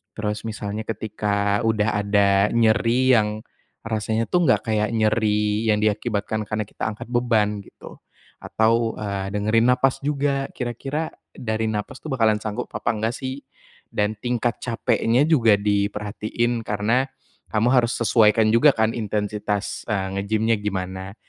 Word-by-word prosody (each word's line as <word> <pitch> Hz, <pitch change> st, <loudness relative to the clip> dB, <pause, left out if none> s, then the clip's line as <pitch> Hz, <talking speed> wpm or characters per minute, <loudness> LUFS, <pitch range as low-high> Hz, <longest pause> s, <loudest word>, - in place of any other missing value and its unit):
Terus 105 Hz, -1 st, -3 dB
misalnya 105 Hz, 0 st, -4 dB
ketika 105 Hz, -1 st, -1 dB
udah 105 Hz, -1 st, +1 dB
ada 100 Hz, -1 st, +3 dB, 0.3 s
nyeri 115 Hz, +3 st, +3 dB
yang 105 Hz, -1 st, 0 dB, 0.4 s
rasanya 110 Hz, +1 st, -1 dB
tuh 180 Hz, 0 st, +2 dB
enggak 130 Hz, -, +2 dB
kayak 105 Hz, -1 st, +1 dB
nyeri 110 Hz, 0 st, +1 dB
yang 105 Hz, -, +2 dB
diakibatkan 110 Hz, 0 st, -1 dB
karena 110 Hz, 0 st, -2 dB
kita -, -, -9 dB
angkat 105 Hz, +1 st, -8 dB
beban 110 Hz, -4 st, +1 dB
gitu, -, -, -14 dB, 0.4 s
atau, 115 Hz, +1 st, +1 dB
eee, 100 Hz, -2 st, -3 dB
dengerin 110 Hz, +3 st, +2 dB
nafas 130 Hz, +1 st, +1 dB
juga, 140 Hz, -1 st, 0 dB
kira-kira 135 Hz, +6 st, -4 dB, 0.2 s
dari 110 Hz, -1 st, -3 dB
nafas 105 Hz, -1 st, -4 dB
tuh 155 Hz, -, -6 dB
bakalan 110 Hz, -4 st, +3 dB
sanggup 110 Hz, +3 st, -4 dB
apa -, -, -1 dB
enggak 110 Hz, +2 st, -2 dB
sih? 130 Hz, 0 st, -5 dB, 0.5 s
Dan 105 Hz, +1 st, -1 dB
tingkat 120 Hz, -1 st, -1 dB
capeknya 120 Hz, +1 st, +1 dB
juga 120 Hz, -10 st, +5 dB
diperhatiin, 105 Hz, +3 st, -1 dB
karena 110 Hz, +6 st, +1 dB, 0.4 s
kamu 110 Hz, +2 st, +2 dB
harus 120 Hz, -2 st, +3 dB
sesuaikan 110 Hz, -1 st, +4 dB
juga 130 Hz, +6 st, +6 dB
kan 110 Hz, 0 st, +2 dB
intensitas, 105 Hz, -2 st, -3 dB
eee, 95 Hz, -2 st, -1 dB
nge-gym-nya 110 Hz, +3 st, +1 dB
gimana. 95 Hz, -1 st, -4 dB
110 Hz, 135 wpm, -23 LUFS, 105-115 Hz, 0.5 s, juga